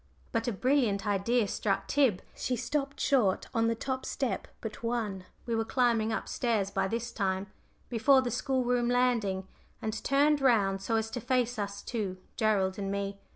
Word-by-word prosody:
But 230 0 -1
a - - +2
brilliant 235 -3 +1
idea 210 +3 +2
struck 195 0 -1
Tib. 265 -10 +2
She 255 - -2
stopped 275 +3 -2
short 225 -9 +2
on 230 0 +2
the 230 - +1
top 260 +3 -3
step 265 -3 -2
but 220 -2 -6
one 220 -5 -2 0.2
we 235 - -2
were 225 0 +1
climbing 230 -2 +2
up 220 - -2
stairs 215 -5 0
by 190 - 0
this 235 +3 -3
time 190 -2 -1 0.4
before 260 +3 +4
the 245 - -2
school 265 +2 0
room 245 0 +1
landing, 230 -7 +1 0.3
and 220 0 -4
turned 285 +1 +3
round 200 -7 +3
so 210 +4 -1
as 225 0 0
to 245 - -4
face 245 -1 0
us 200 0 -4
two 205 -6 -3 0.2
Gerald 205 -4 +1
and 195 -1 -2
me. 200 0 -3
225 Hz, 180 wpm, -30 LUFS, 200-250 Hz, 0.4 s, before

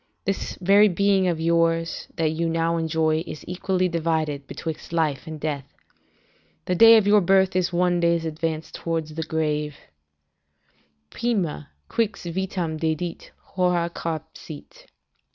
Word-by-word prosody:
This 195 0 -2
very 200 +3 +6
being 195 0 +2
of 170 -3 0
yours 165 0 +1
that 160 -1 +1
you 165 +1 -1
now 165 0 0
enjoy 160 -1 +1
is 155 - -8
equally 185 +1 0
divided 160 -4 -1
betwixt 160 -1 -6
life 155 -5 0
and 155 -1 -6
death. 145 -3 -4 0.9
The 180 - 0
day 225 +5 +8
of 215 - +3
your 205 0 +5
birth 190 0 +3
is 180 -1 +1
one 175 0 +2
day's 170 -1 +2
advance 160 0 -3
towards 165 -2 -3
the 160 - -4
grave: 150 -2 -1 1.4
"Prima, 185 - -2 0.2
qux 200 -7 -2
vitam 180 -3 -2
dedit, 160 +2 -3
hora 180 -2 0
carpsit." 160 -2 -7
165 Hz, 135 wpm, -24 LUFS, 160-180 Hz, 1.4 s, day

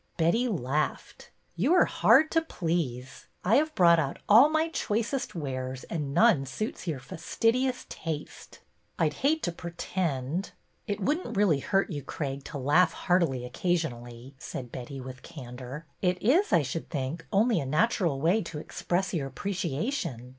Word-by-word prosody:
Betty 180 +10 +2
laughed. 150 - -2
'' - - -41
You 250 - +3
are 360 - +6
hard 315 - +4
to 325 - +3
please. 160 - -3 0.2
I 215 +7 +5
have 310 +2 +1
brought 170 -2 +6
out 140 -4 -2
all 235 +8 +8
my 315 +1 +1
choicest 235 - -2
wares 130 -4 -4
and 150 -4 -2
none 165 -5 +4
suits 215 - -5
your 155 -4 -1
fastidious 230 - -1
taste." 155 -2 -7 0.4
I 160 - +3
'd - - -10
hate 300 - +1
to 175 - 0
pretend." 170 -2 -3 0.2
'' - - -42
It 205 0 -2
would 295 - +1
n't 235 - -6
really 190 -9 +4
hurt 195 +7 0
you, 145 -3 -3
Craig, 140 0 -4
to 150 - -6
laugh 155 +6 +3
heartily 170 -9 +1
occasionally," 125 -5 -3
said 125 -3 -7
Betty, 130 +2 -7
with 130 0 -8
candor. 130 +2 -9 0.2
It 180 -1 +1
is, 300 - +3
I 170 -5 +4
should 140 +5 -4
think, 145 +2 -4
only 215 0 +3
a 140 - -3
natural 165 - +1
way 175 +9 +3
to 165 -4 -7
express 175 +4 -2
your 145 -6 -1
appreciation. 165 - -3
165 Hz, 165 wpm, -28 LUFS, 135-210 Hz, 0.4 s, all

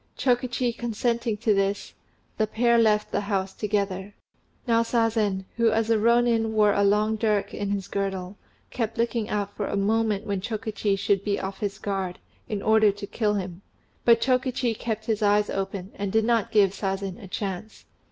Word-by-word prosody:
Chokichi 245 -1 0
consenting 235 -1 -1
to 220 0 +2
this, 195 0 -1 0.5
the 215 - +2
pair 235 +2 +3
left 210 -2 +2
the 205 - 0
house 195 -2 -2
together. 200 -1 -2 0.5
Now 230 -1 +4
Sazen, 225 -4 +1
who 230 -1 +4
as 225 +1 +1
a 225 - +4
Rônin 235 0 +3
wore 210 -2 +3
a 200 - +2
long 210 +2 +2
dirk 210 -2 0
in 205 -1 -3
his 200 -2 -2
girdle, 195 -1 -3 0.4
kept 225 -2 -3
looking 230 -2 0
out 205 -1 -2
for 205 - -2
a - - -2
moment 215 0 +1
when 200 -2 -2
Chokichi 215 -2 -2
should 195 0 +1
be 200 -1 0
off 195 0 -5
his 200 -2 -3
guard, 195 -3 -3 0.3
in 205 -2 -3
order 220 -1 +5
to 200 +1 -7
kill 210 0 0
him; 185 -2 -4 0.4
but 230 -1 +6
Chokichi 255 -2 +1
kept 220 -1 -4
his 220 -1 -1
eyes 205 0 +3
open, 195 -1 -4
and 200 -1 -3
did 220 +1 +2
not 230 -3 +2
give 200 -3 +4
Sazen 195 0 -3
a - - -8
chance. 195 +2 -5
210 Hz, 180 wpm, -25 LUFS, 200-225 Hz, 0.5 s, but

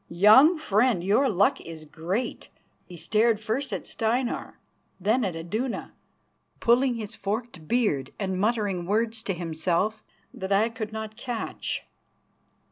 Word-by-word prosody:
Young 215 - +7
friend, 220 - +2
your 220 +8 +3
luck 200 0 +2
is 160 -2 -9
great," 180 +11 -3
and - - -35 0.3
he 180 - -10
stared 215 +6 +2
first 230 +6 -2
at - - -4
Steinar, 235 +2 -2 0.4
then 220 +7 +2
at 185 -5 -2
Iduna, 215 +10 -3 0.7
pulling 245 +2 +3
his 215 -3 -6
forked 205 -5 -4
beard 180 - +1
and 190 -2 -2
muttering 205 -5 0
words 220 +2 0
to 195 -5 -2
himself 175 +5 -1 0.3
that 190 +1 -6
I 210 +4 +4
could 225 -2 -6
not 220 0 -6
catch. 240 -4 -4
215 Hz, 135 wpm, -26 LUFS, 185-235 Hz, 0.7 s, Young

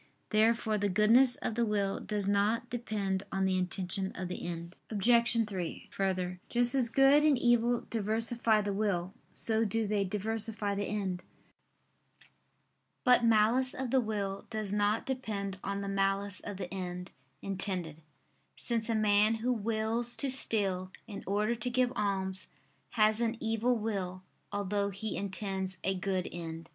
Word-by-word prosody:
Therefore 220 0 +2
the 205 0 +1
goodness 230 +6 +5
of - - -3
the 235 +2 +1
will 205 -3 0
does 205 -2 -3
not 210 +4 +1
depend 205 -5 -2
on 195 0 0
the 190 0 +1
intention 185 +1 -1
of 185 -1 -4
the 180 - -5
end. 170 +1 -6
Obj. 230 +1 +3
3: 185 -5 -5
Further, 185 -2 -2
just 245 +1 +3
as 255 -4 +2
good 270 +4 +5
and 300 -3 +4
evil 240 0 +2
diversify 225 0 +2
the 205 -1 -2
will, 195 -3 -1 0.2
so 225 0 +1
do 225 +1 0
they 205 -1 +1
diversify 210 +1 -2
the 200 0 -2
end. 190 -4 -2 1.8
But 250 -1 +5
malice 230 +3 +4
of 260 -2 -3
the 265 - +4
will 200 -3 -3
does 215 -3 -3
not 210 +1 +1
depend 205 -7 -3
on 200 0 -3
the 200 - -4
malice 195 0 0
of 205 -2 -7
the 185 -1 -6
end 180 -1 -5 0.3
intended; 185 -5 -3 0.5
since 230 -1 -1
a 225 - +1
man 210 +1 +3
who 240 +3 0
wills 225 +2 -1
to 275 -2 0
steal 195 -7 +1
in 200 -2 -8
order 210 +4 +1
to 240 +1 -1
give 250 0 +1
alms, 190 -2 -2 0.5
has 215 -1 +3
an 230 0 0
evil 225 +2 +1
will, 190 -4 -3 0.3
although 200 0 -1
he 205 +3 -4
intends 190 -1 -3
a 190 - +1
good 185 -1 -2
end. 165 -1 -7
210 Hz, 155 wpm, -31 LUFS, 195-230 Hz, 1.8 s, goodness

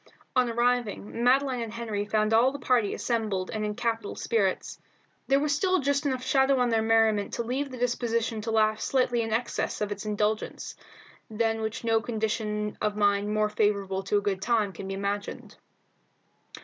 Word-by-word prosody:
On 250 -1 +3
arriving, 235 -2 -1
Madeline 260 0 +3
and 230 -2 -4
Henry 220 -3 -3
found 215 +1 +1
all 240 +4 +5
the 285 - -6
party 245 -7 +1
assembled 215 -6 -1
and 215 -1 -3
in 210 0 -2
capital 230 -3 -2
spirits; 200 -5 -1 0.5
There 275 +1 +4
was 295 0 +1
still 370 +4 +2
just 280 +1 0
enough 260 -2 -2
shadow 270 0 +3
on 245 -1 +2
their 225 -1 +2
merriment 220 -2 +2
to 235 - -2
leave 265 +4 -2
the 255 - -8
disposition 230 -2 -1
to 225 - -4
laugh 215 -1 +2
slightly 250 -3 +1
in 225 -1 -3
excess 235 +2 -1
of 210 -1 -2
its 205 -1 -4
indulgence, 210 +1 -2 0.6
than 225 0 0
which 220 +1 -4
no 225 -1 +2
condition 215 -2 -2
of 210 -1 0
mind 205 0 +2
more 215 0 +1
favourable 200 -3 0
to 205 +1 +2
a - - +1
good 200 -2 -2
time 215 -4 +1
can 190 - -7
be 195 - -3
imagined. 200 +1 -4
225 Hz, 180 wpm, -27 LUFS, 210-245 Hz, 0.6 s, all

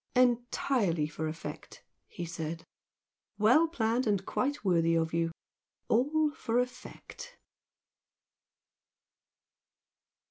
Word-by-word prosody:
"Entirely 245 - +2
for 155 +1 -4
effect!" 160 +1 -8 0.2
he 175 - -6
said, 165 -1 -5 0.7
"Well 245 +11 +5
planned 235 -5 0
and 200 -2 +1
quite 285 -2 -2
worthy 165 -3 +3
of 160 0 0
you! 165 0 +1 0.6
All 295 +6 +2
for 230 -5 -2
effect!" 250 - -5
220 Hz, 85 wpm, -30 LUFS, 165-255 Hz, 0.7 s, Well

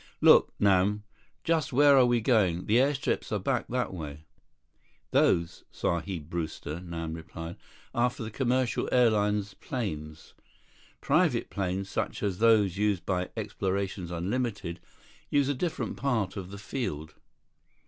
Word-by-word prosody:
"Look, - - +6
Nam. 100 +1 +3 0.4
Just 160 -4 +1
where 140 +2 +6
are 130 -2 +6
we 120 -1 +2
going? 100 -7 +2
The 110 - +3
airstrips 135 +1 0
are - - +1
back - - -1
that 125 -5 -2
way." 75 -3 -7 0.9
"Those, 85 +1 +2
Sahib 85 -2 -3
Brewster," 80 -1 -4
Nam 85 -2 -5
replied, 80 +1 -7 0.4
"are 120 +1 +3
for 125 -1 -8
the 110 - -6
commercial 125 0 0
airlines 105 -4 +2
planes. 80 - -5 0.7
Private - - +2
planes, 95 0 -2
such - - -3
as 95 -3 -1
those 105 -5 +4
used 105 -3 0
by 90 -1 -1
Explorations 95 -2 -2
Unlimited, 95 0 -3 0.5
use 145 -1 +2
a - - +2
different 160 +5 -3
part 110 -9 0
of 95 -2 -6
the 100 - -8
field." 80 - -4
100 Hz, 135 wpm, -28 LUFS, 85-120 Hz, 0.9 s, Look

